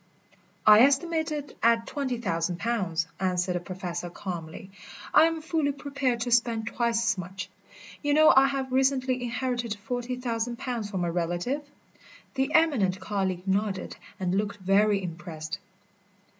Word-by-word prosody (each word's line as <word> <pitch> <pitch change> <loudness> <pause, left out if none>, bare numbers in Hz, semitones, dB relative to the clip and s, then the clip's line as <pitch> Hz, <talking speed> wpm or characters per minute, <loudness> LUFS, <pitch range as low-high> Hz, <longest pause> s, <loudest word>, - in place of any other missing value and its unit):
"I 215 0 +9
estimate 315 +5 +3
it 290 -1 -5
at 230 0 +3
twenty 265 -4 -2
thousand 175 -5 -1
pounds," 185 -7 -1
answered 180 -1 0
the 180 - -1
Professor 175 -1 -5
calmly. 175 0 -7 0.4
"I 310 - +8
am 325 -1 -1
fully 315 -3 0
prepared 275 -4 -2
to 245 +1 -2
spend 230 -2 +2
twice 235 0 0
as 205 - -3
much. 185 +1 -6 0.5
You 290 -1 +1
know 310 0 +7
I 270 +1 +7
have 270 -1 -3
recently 260 -1 +2
inherited 240 -2 -2
forty 245 +4 -4
thousand 235 -1 -2
pounds 235 -5 -4
from 190 -3 -2
a 170 - 0
relative?" 175 - -1 0.7
The 270 +2 0
eminent 245 - +3
colleague 190 -3 -2
nodded 195 -1 -1 0.2
and 185 -1 -1
looked 205 +1 -1
very 200 +1 +2
impressed. 170 0 -6
225 Hz, 145 wpm, -27 LUFS, 185-260 Hz, 0.7 s, I